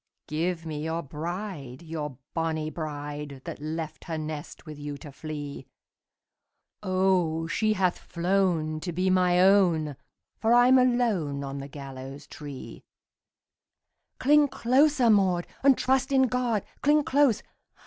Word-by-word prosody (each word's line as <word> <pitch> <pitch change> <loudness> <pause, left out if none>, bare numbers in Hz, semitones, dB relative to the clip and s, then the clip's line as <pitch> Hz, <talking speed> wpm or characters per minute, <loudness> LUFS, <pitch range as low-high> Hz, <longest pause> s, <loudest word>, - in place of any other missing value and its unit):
"Give 165 +2 -2
me 155 -2 -4
your 165 +1 -2
bride, 155 -2 -6
your 150 -5 -5 0.2
bonnie 160 -2 -1
bride, 145 -3 -6
That - - -7
left 155 +1 -5
her 165 -2 -3
nest 155 +1 -6
with 155 -2 -9
you 145 0 -5
to 145 +1 -10
flee! 145 -2 -7 1.1
O, 185 -4 +1
she 215 +6 +1
hath 185 -3 +1
flown 170 -3 0
to 175 +2 -4
be 185 +3 +1
my 180 -1 +3
own, 180 -6 +4 0.4
For 230 +2 +4
I'm 250 +2 +6
alone 220 - +1
on 140 0 -5
the 140 - -6
gallows 135 0 -9
tree!" 145 -3 -9 1.3
"Cling 295 +2 +5
closer, 260 -1 +3
Maud, 185 -4 +3 0.2
and 275 -1 +5
trust 265 +1 +1
in 265 -1 +5
God! 245 -4 0 0.2
Cling 295 +1 +4
close! 275 -5 +3
170 Hz, 130 wpm, -27 LUFS, 150-215 Hz, 1.3 s, I'm